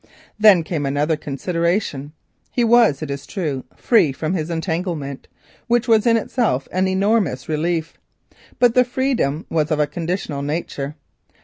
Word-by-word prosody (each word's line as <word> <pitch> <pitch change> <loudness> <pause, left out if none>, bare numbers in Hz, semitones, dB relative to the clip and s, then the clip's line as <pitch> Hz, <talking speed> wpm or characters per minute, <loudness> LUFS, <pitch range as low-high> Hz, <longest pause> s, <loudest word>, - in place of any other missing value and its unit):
Then 205 -6 +6
came 155 -4 -2
another 145 +3 +1
consideration. 155 0 -2 0.4
He 245 - 0
was, 230 - +4
it 145 - -4
is 140 0 -6
true, 150 -9 -3
free 220 - +3
from 155 +5 -3
his 160 -3 -2
entanglement, 160 -4 -3 0.4
in 230 -1 +3
itself 220 - -1
an 185 +1 +1
enormous 190 - +1
relief, 160 +1 -2 0.6
but 245 -2 +4
the 250 - +5
freedom 245 - -1
was 155 -1 +1
of 155 -2 0
a 150 - +4
conditional 165 -3 -4
nature. 145 -1 -4
165 Hz, 135 wpm, -20 LUFS, 145-210 Hz, 0.6 s, Then